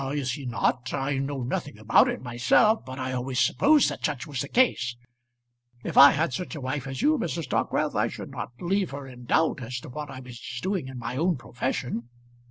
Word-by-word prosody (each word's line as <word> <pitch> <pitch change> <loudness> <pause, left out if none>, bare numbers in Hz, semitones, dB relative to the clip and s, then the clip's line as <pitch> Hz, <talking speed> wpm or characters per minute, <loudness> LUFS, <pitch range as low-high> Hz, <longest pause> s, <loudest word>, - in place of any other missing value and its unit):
"Is 140 -3 -1
he 135 +1 -5
not? 125 +1 0
I 135 0 -1
know 135 -1 -3
nothing 125 -1 -3
about 110 +1 +4
it - - -4
myself, 125 - +3
but 130 0 -8
I 130 -1 -3
always 125 0 -3
supposed 295 - +4
that - - -7
such 140 -6 -1
was 140 -4 -4
the 140 - -3
case. 140 - +2 0.9
If - - -4
I 140 - +11
had 150 -2 0
such 180 +3 -4
a 150 - -6
wife 130 +1 -3
as 135 - -4
you, 305 0 +4
Mrs. 165 - -3
Dockwrath, - - 0
I - - +2
should - - -8
not - - -5
leave 190 +2 0
her 140 0 -7
in 125 -2 -11
doubt 155 +2 +2
as 125 +1 -4
to - - -10
what 150 +3 -6
I 135 -1 -8
was 125 -2 -10 0.2
doing 185 -6 -1
in 130 -1 -8
my 120 +1 -4
own 170 +1 +1
profession." 125 -1 -3
135 Hz, 215 wpm, -26 LUFS, 125-155 Hz, 0.9 s, I